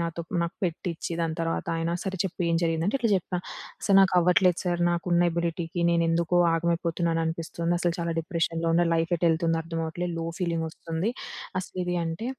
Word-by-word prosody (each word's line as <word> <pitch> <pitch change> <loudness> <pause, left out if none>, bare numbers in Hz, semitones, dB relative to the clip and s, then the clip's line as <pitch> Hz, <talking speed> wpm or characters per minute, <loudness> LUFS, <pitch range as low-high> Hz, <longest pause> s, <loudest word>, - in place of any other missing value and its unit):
నాతో 170 0 -2 0.2
నాకు 170 +2 -4
పెట్టిచ్చి, 170 -1 -3
దాని 165 -1 -1
తర్వాత 165 0 -1
అయన, 165 +1 -1
"సరే 190 -1 -3
చెప్పి 180 -1 -3
ఏం 165 - +3
జరిగిందంటే?" 165 +7 +1
ఇట్లా 230 -4 +1
చెప్పా, 180 0 -3 0.5
సర్ 195 - +5
నాకు 190 -1 +4
అవ్వట్లేదు 180 0 +4
సర్, 175 -1 0
నాకున్న 175 0 +2
ఎబిలిటీకి 170 +1 -2
నేనేందుకొ 170 +1 +2 0.2
ఆగమైపోతున్నాను 170 0 0
అనిపిస్తుంది. 165 +1 -2
అసలు 175 -1 0
చాలా 170 -1 -1
డిప్రెషన్‌లో 165 -1 -1
ఉన్న, 175 - +4
లైఫ్ 165 +1 0
ఎటేళ్తుందో 165 0 +2
అర్థమవ్వట్లేదు. 165 +1 -3
లో 165 - -3 0.2
ఫీలింగోస్తుంది. 165 +3 -2 0.5
అసలు 185 - -9
ఇది 180 0 -1
అంటే. 165 +9 -3
170 Hz, 160 wpm, -27 LUFS, 165-175 Hz, 0.5 s, సర్